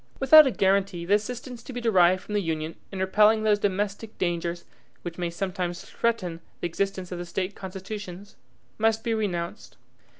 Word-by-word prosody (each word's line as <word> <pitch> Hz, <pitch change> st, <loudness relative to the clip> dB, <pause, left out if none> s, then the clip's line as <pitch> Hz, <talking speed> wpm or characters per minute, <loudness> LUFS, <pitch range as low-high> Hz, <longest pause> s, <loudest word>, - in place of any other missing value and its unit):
Without 300 Hz, +2 st, +9 dB
a -, -, +1 dB
guaranty 190 Hz, -4 st, +1 dB
the 195 Hz, -, +2 dB
assistance 240 Hz, +3 st, -2 dB
to 250 Hz, -, -9 dB
be 245 Hz, -, -3 dB
derived 185 Hz, -6 st, +4 dB
from 210 Hz, -, -7 dB
the 205 Hz, -, +2 dB
Union 160 Hz, -2 st, -3 dB, 0.2 s
in 195 Hz, -, -6 dB
repelling 210 Hz, +3 st, +4 dB
those 210 Hz, -1 st, +3 dB
domestic 205 Hz, +2 st, -2 dB
dangers 170 Hz, -1 st, -2 dB, 0.4 s
which 175 Hz, 0 st, -6 dB
may 175 Hz, -1 st, -1 dB
sometimes 180 Hz, 0 st, -3 dB
threaten 185 Hz, -8 st, -2 dB, 0.2 s
the -, -, -4 dB
existence 190 Hz, +1 st, -3 dB
of 180 Hz, -, -4 dB
the -, -, -3 dB
State 185 Hz, +3 st, -3 dB
constitutions, 195 Hz, 0 st, -8 dB, 0.4 s
must 225 Hz, 0 st, +2 dB
be 230 Hz, -, 0 dB
renounced. 180 Hz, -6 st, -3 dB
195 Hz, 170 wpm, -26 LUFS, 175-215 Hz, 0.4 s, Without